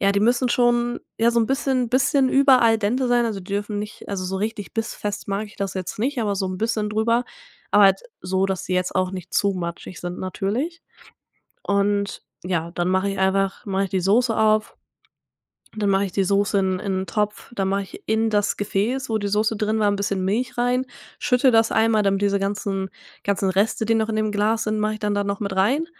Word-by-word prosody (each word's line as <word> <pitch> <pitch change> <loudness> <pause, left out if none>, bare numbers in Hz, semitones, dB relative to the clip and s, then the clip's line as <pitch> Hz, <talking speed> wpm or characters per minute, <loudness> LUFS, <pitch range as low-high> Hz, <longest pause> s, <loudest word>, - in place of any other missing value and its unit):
ja, 200 0 +3
die 200 - +1
müssen 240 +3 +2
schon 240 0 +2 0.2
ja 230 +1 +4
so 235 - +2
'n 225 - +1
bisschen 265 -2 0
bisschen 265 +1 +3
über 270 -2 +5
al 225 -1 +4
dente 240 +5 0
sein, 240 -1 +3
also, 215 -3 -3
die 190 +2 -9
dürfen 205 +1 -2
nicht 210 0 -8
also, 190 -2 -3
so 190 +1 -3
richtig 210 0 -4
bissfest 210 -2 -4
mag 200 +2 -2
ich 205 - -16
das 195 -1 -3
jetzt 185 +1 -5
nicht, 255 +4 -1
aber 210 -3 0
so 190 0 -1
'n 185 0 -4
bisschen 220 -1 -1
drüber, 230 +3 +1 0.5
aber 205 0 +7
halt 195 - +5 0.2
so, 190 +1 0
dass 190 -1 -3
sie 185 - -2
jetzt 180 0 -1
auch 185 0 +1
nicht 180 -1 -8
zu 200 -1 +2
matschig 175 0 -6
sind 175 0 -5
natürlich. 235 - -3 0.8
Und, 200 0 0 0.2
ja, 170 -2 -1
dann 175 0 -1
mache 190 +1 +1
ich 195 - -5
einfach 195 0 +1
mache 195 0 0
ich 195 - -6
die 190 - 0
Soße 225 +5 +2
auf, 215 0 +2 1.0
dann 205 -2 +1
mache 195 +1 +2
ich 185 - -8
die 195 - +1
Soße 200 +1 +2
in 190 -1 0
in 190 -2 -1
'n - - -7
Topf, 210 +4 -2
dann 195 -4 -1
mache 195 +1 0
ich 195 - -11
in 220 +1 +1
das 205 -1 +1
Gefäß, 225 +6 -1
wo 220 - +1
die 205 -1 -2
Soße 215 +2 +1
drin 215 +1 0
war, 210 - +3
'n 205 - 0
bisschen 200 -2 -1
Milch 220 +7 -1
rein, 250 +2 +1 0.3
schüttle 250 +1 +3
das 225 0 +4
einmal, 220 -1 +3
damit 195 0 +1
diese 200 0 +2
ganzen 195 -1 -2 0.4
ganzen 200 -1 +1
Reste, 200 +4 +1
die 225 - +3
noch 220 0 0
in 220 - -1
dem 215 -1 0
Glas 215 +2 +1
sind, 215 0 -1
mache 215 0 0
ich 215 - -9
dann 210 -1 0
da 205 0 0
noch 200 +1 -3
mit 200 -2 -3
rein. 260 +12 +2
205 Hz, 230 wpm, -23 LUFS, 195-225 Hz, 1.0 s, aber